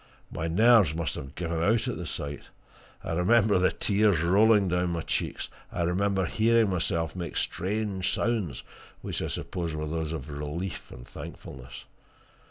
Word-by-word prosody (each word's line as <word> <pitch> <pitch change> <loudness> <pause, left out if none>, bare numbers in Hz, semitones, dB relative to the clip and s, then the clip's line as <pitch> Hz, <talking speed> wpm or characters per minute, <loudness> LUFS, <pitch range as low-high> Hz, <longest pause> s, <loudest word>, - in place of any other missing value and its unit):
My 80 - -3
nerves 105 -2 +5
must 80 -3 -1
have 70 0 -7
given 85 -1 -2
out 110 +8 +2
at 125 - -2
the 85 - -5
sight 70 -1 -5 0.5
I 85 - -3
remember 100 +3 +4
the 95 - +3
tears 100 -5 +2
rolling 100 +3 +5
down 90 0 +1
my 85 - -2
cheeks; - - -2 0.2
I 85 - -1
remember 95 +2 +1
hearing 110 +2 +3
myself 80 -2 -1
make 85 -4 -4
strange 100 0 -1
sounds, 105 - -1 0.4
which - - -3
I - - -2
suppose 85 -4 -4
were 75 0 -3
those 80 0 -3
of 75 -2 -5
relief 75 +6 -5
and - - -11
thankfulness. 65 0 -10
90 Hz, 160 wpm, -28 LUFS, 80-100 Hz, 0.5 s, nerves